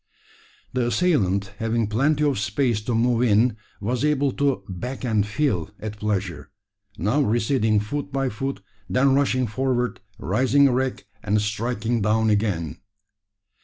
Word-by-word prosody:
The 125 -1 +1
assailant 105 - +1
having 115 0 0
plenty 140 +8 +1
of 145 -7 +1
space 110 +2 0
to 120 - 0
move 120 +1 +2
in, 115 0 +3 0.2
was 120 +5 -2
able 145 -2 +2
to 135 -7 0
"back 125 +9 -5
and 110 -4 +1
fill" 105 - 0
at 105 -1 -6
pleasure, 95 -8 -2 0.5
now 110 - +1
receding 110 -2 +2
foot 140 +7 -4
by 135 -1 0
foot, 135 0 -4 0.3
then 130 +7 +3
rushing 130 -2 +2
forward, 125 0 -1 0.2
rising 130 +8 +3
erect, 130 0 0 0.2
and 105 -1 +1
striking 110 +2 -1
down 110 +1 +2
again. 95 - -1
115 Hz, 135 wpm, -23 LUFS, 105-130 Hz, 0.5 s, in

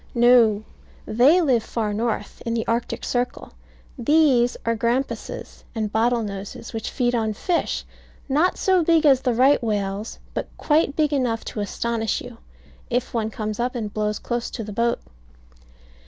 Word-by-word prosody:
No, 235 -3 +5 0.4
they 270 +11 +5
live 260 -8 +3
far 215 -1 -2
north, 220 -1 -3
in 230 0 -2
the 225 - -1
Arctic 230 +1 -2
circle; 245 0 -2 0.5
these 255 -2 +3
are 230 0 +1
grampuses, 235 +4 -3
and 215 -2 -2
bottle 230 +2 +2
noses, 200 +3 -7
which 225 - -3
feed 245 -2 0
on 220 -2 0
fish; 340 - -1 0.4
not 305 +7 +2
so 375 -2 +3
big 325 -1 +3
as 270 -3 +5
the 250 -3 0
right 265 +4 +5
whales, 205 -1 -2 0.2
but - - -3
quite 300 -1 +2
big 305 -2 +1
enough 245 -5 0
to - - -5
astonish 225 +2 -1
you, 245 -2 -10 0.5
if 245 0 -1
one 220 -2 0
comes 215 0 -4
up 245 +2 -1
and 215 -4 -4
blows 210 -1 -1
close 240 -1 -3
to 230 - -5
the 210 0 -7
boat. 235 +2 +1
235 Hz, 160 wpm, -23 LUFS, 220-255 Hz, 0.5 s, No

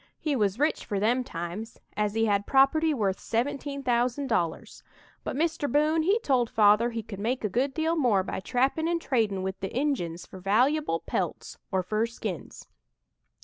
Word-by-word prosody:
He 300 -3 -1
was 205 -4 +1
rich 300 +4 +1
for 200 -3 -2
them 240 +5 +2
times, 180 +3 -6 0.2
as 210 0 -1
he 225 0 +2
had 205 -1 +1
property 295 +4 +4
worth 205 -9 0
seventeen 280 +4 -2
thousand 245 +2 +1
dollars; 170 -10 -2 0.4
but - - -4
Mr. 310 -2 0
Boone 305 +3 +3
he 390 +7 +3
told 250 - +2
Father 215 +2 +4
he 230 -2 -4
could 200 -2 -8
make 235 +5 -1
a 210 - 0
good 255 +7 0
deal 320 +1 +1
more 240 - +3
by - - -4
trappin' 265 - 0
and 340 0 +1
tradin' 220 - 0
with 190 0 -4
the 195 - -3
Injuns 180 - -2
for 190 - -11
valuable 220 - +2
pelts, - - -4
or 190 -2 +1
fur 215 +5 0
skins. 235 - -7
235 Hz, 180 wpm, -27 LUFS, 205-285 Hz, 0.4 s, property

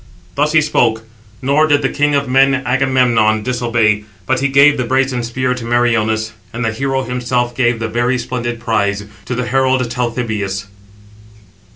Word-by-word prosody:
Thus 150 +5 0
he 160 - +5
spoke; 110 -7 +1 0.4
nor 145 +4 +3
did 145 -1 +2
the - - +3
king 145 0 +1
of 140 -1 0
men, 135 +2 +4
Agamemnon, 125 -4 +2
disobey; 115 -4 +1 0.2
but 130 0 0
he 140 - +1
gave 140 +2 +5
the 125 - 0
brazen 130 0 0
spear 125 +2 -1
to 125 -2 -7
Meriones; 115 -2 +1 0.2
and 120 +1 -3
the 115 - 0
hero 135 +2 -1
himself 125 -1 -2
gave 120 -2 +1
the 115 0 -3
very 120 +3 0
splendid 120 -1 -4
prize 100 -3 -1 0.2
to 125 - -3
the 125 0 -2
herald 130 -1 +1
Talthybius. 110 -5 -3
125 Hz, 165 wpm, -16 LUFS, 115-135 Hz, 0.4 s, he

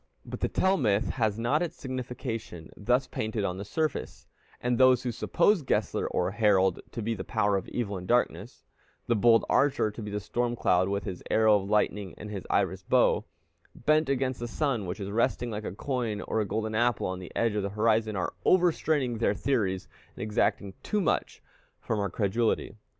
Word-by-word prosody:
But - - -7
the - - +1
Tell 190 +1 +2
myth 105 -7 +1
has 110 -4 0
not 120 +7 +1
its 175 - -2
signification 125 - -5
thus 125 +5 +1
painted 110 -3 -3
on 90 0 -3
the - - -4
surface; 155 +9 -3 0.3
and 125 -1 0
those 130 -1 +5
who 125 - -1
suppose 170 - +2
Gessler 135 - 0
or 90 +1 0
Harald 95 -4 +3
to 115 - -4
be 115 +2 -1
the - - -5
power 105 -3 +1
of 95 - -2
evil 105 -5 -3
and 90 - -9
darkness, 120 +3 0 0.4
the 120 - +1
bold 115 +1 +4
archer 135 -6 +2
to 110 - -9
be 105 - -5
the 105 0 -2
storm 120 +4 -1
cloud 90 -4 +2
with 100 0 -1
his 95 -4 -6
arrow 110 -1 +5
of 100 - -7
lightning 105 -2 0
and 105 - -8
his 100 -3 -6
iris - - +1
bow, - - +2 0.5
bent 155 +3 +2
against 130 -2 0
the 120 - -4
sun, 120 - -1
which 90 +5 -4
is 100 0 -4
resting 120 +2 0
like 105 0 -5
a - - -3
coin 115 0 -2
or 110 - -1
a - - -1
golden 110 +1 -2
apple 120 +1 +1
on 95 0 -3
the 90 - -9
edge 115 -2 +1
of 105 - 0
the 100 - -2
horizon, 110 +1 +1
are 90 -2 -2
over 180 -1 +5
straining 135 -8 -1
their 105 -3 +2
theories, 100 -10 -1 0.3
and - - -5
exacting 105 -2 0
too 210 - -1
much 185 - -1 0.4
from 110 - -2
our 100 -1 0
credulity. 105 +2 0
110 Hz, 200 wpm, -28 LUFS, 100-125 Hz, 0.5 s, those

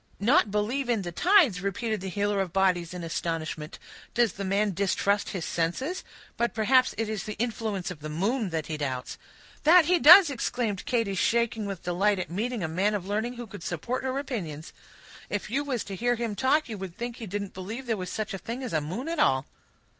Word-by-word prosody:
"Not 240 - +4
believe 230 +6 -1
in 225 -5 +1
the 175 - -4
tides!" 315 - +4
repeated 205 +2 -2
the 190 - -4
healer 205 +1 0
of 185 -3 -3
bodies 180 -2 +1
in 180 -1 -6
astonishment. 165 -2 -3 0.4
"Does 235 -4 +3
the 200 - -5
man 200 +2 +1
distrust 200 +2 +1
his 180 -4 -4
senses? 260 - -2 0.3
But 235 0 0
perhaps 255 +4 +3
it 225 - -1
is 215 -3 -3
the 210 - -5
influence 215 -5 -2
of 175 - -8
the 155 +1 -6
moon 205 - 0
that 160 -3 -2
he 155 - -4
doubts." 130 -4 -4 0.4
"That 335 +1 +7
he 355 +1 +3
does!" 340 +3 +9
exclaimed 235 -6 -2
Katy, 230 -5 +1
shaking 225 +2 +1
with 195 -3 -6
delight 195 +4 +2
at 180 -2 -4
meeting 225 +5 -2
with 160 -2 -2
a - - -7
man 200 +4 +2
of 190 -3 -3
learning, 215 +5 -1
who 240 0 -6
could 205 -3 -10
support 180 +12 -3
her 260 0 -1
opinions. 175 - -5 0.6
"If 205 +1 -3
you 280 +4 +1
was 260 -6 -2
to 195 - -6
hear 245 +4 +1
him 235 -2 -2
talk, 270 +6 +2
you 215 -3 -6
would 185 -3 -7
think 240 0 -5
he 225 - -7
didn't 200 +1 -4
believe 215 +8 -6
there 230 -2 0
was 185 -3 -5
such 215 +1 -3
a 195 - -4
thing 240 +6 -5
as 250 - -5
a 155 - +2
moon 185 - -5
at 330 -1 -2
all." 130 - +3
205 Hz, 220 wpm, -27 LUFS, 180-240 Hz, 0.6 s, does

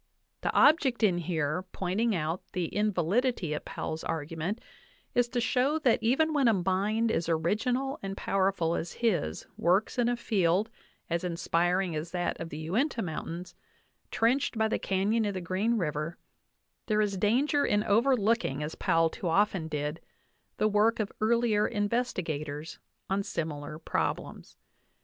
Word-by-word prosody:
The - - 0
object 275 -6 +4
in 180 -5 +4
here 160 -1 -1
pointing 200 +4 0
out 165 +1 -2
the 175 -3 -2
invalidity 210 - +1
of 150 - -4
Powell's 160 0 -4
argument 165 +6 -3 0.5
is 245 -1 +2
to 245 - -1
show 255 +5 +2
that 255 -7 +2
even 275 +8 +2
when 280 -4 +3
a 225 - +5
mind 200 +5 +1
as 170 -4 -1
original 235 - 0
and 195 0 -5
powerful 190 -4 +1
as 170 - -3
his 180 - -1
works 190 +8 +2
in 240 0 +3
a 245 - +1
field 200 -1 +1 0.4
as 170 +1 -1
inspiring 175 +1 0
as 155 +2 -3
that 175 -1 -1
of 165 - -5
the 150 - -7
Uinta 225 - -1
Mountains, 170 +1 -5 0.6
trenched 240 +1 +1
by 220 0 +3
the 220 - -1
canyon 200 +4 +1
of 205 -1 -2
the - - -2
Green 190 +7 0
River, 155 -2 -2 0.7
there 215 -1 +2
is 205 -2 +1
danger 260 +9 +2
in 205 0 +2
overlooking, 225 - +2
as 150 - -4
Powell 165 0 +2
too 180 - -5
often 190 -1 +2
did, 150 +1 -3 0.6
the 215 - +3
work 215 +2 +3
of 210 -2 -1
earlier 220 -1 +3
investigators 170 - -2 0.3
on 195 +1 0
similar 155 -5 -4
problems. 160 - -3
195 Hz, 150 wpm, -29 LUFS, 165-230 Hz, 0.7 s, a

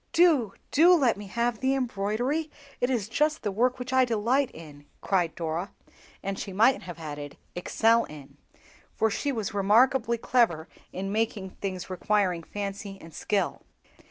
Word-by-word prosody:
"Do, 310 - +4 0.2
do 345 +5 +7
let 265 -8 +3
me 205 0 -9
have 235 +2 -1
the 265 +1 +1
embroidery, 250 +6 -1 0.3
it 245 - +1
is 235 -6 0
just 300 +7 0
the 205 - -1
work 245 +5 +1
which 255 +1 -5
I 260 0 +5
delight 240 +3 +1
in," 145 -3 -13
cried 175 -4 0
Dora; 165 +2 -3 0.5
and 195 0 -3
she 195 - -5
might 225 +7 +4
have 175 -3 -8
added, 145 -3 -7 0.2
"excel 225 +6 +2
in," 145 -3 -12 0.6
for 220 0 +2
she 285 +7 -1
was 220 -7 -3
remarkably 230 +4 +3
clever 225 -10 +1 0.2
in 195 +2 -4
making 210 -3 -1
things 185 -2 -5
requiring 185 -1 0
fancy 200 +2 -6
and 165 -3 -13
skill. 195 0 -1
210 Hz, 155 wpm, -27 LUFS, 185-250 Hz, 0.6 s, do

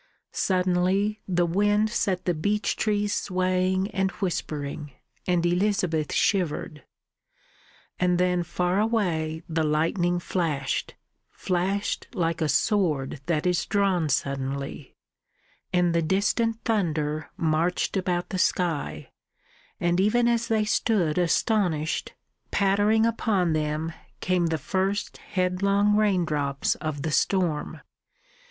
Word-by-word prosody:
Suddenly 185 +3 +1
the 175 -2 +2
wind 205 +5 +2
set 190 -6 -1
the 175 - +2
beech 205 +6 0
trees 205 -1 0
swaying 185 +1 0
and 190 0 0
whispering, 150 -6 -4 0.3
and 175 -2 +2
Elizabeth 175 -4 +1
shivered. 170 -5 0 1.2
And 180 -1 +2
then 180 0 +2
far 180 +2 0
away 170 -8 0
the 160 -1 -1
lightning 165 +4 +1
flashed, 155 -7 -2 0.3
flashed 190 +3 -2
like 165 -2 -1
a 155 - +1
sword 150 - +1
that 170 -2 0
is 180 -1 +1
drawn 190 -6 +1
suddenly, 140 +1 -3 0.8
and 180 -2 +2
the 170 - +2
distant 215 +6 0
thunder 155 -8 -1
marched 165 +4 0
about 180 -2 -1
the 185 - -3
sky, 175 -5 -1 0.7
and 175 -1 +1
even 235 +5 +3
as 235 -1 +1
they 220 -1 +1
stood 195 -7 +1
astonished, 175 -3 0 0.3
pattering 205 +3 +3
upon 205 -7 +1
them 155 +1 -2 0.3
came 180 -2 +1
the 165 -1 0
first 190 +7 -2
headlong 200 +2 +1
raindrops 155 -10 +1
of 150 -3 -5
the 160 - -1
storm. 170 -2 0
180 Hz, 110 wpm, -26 LUFS, 160-200 Hz, 1.2 s, even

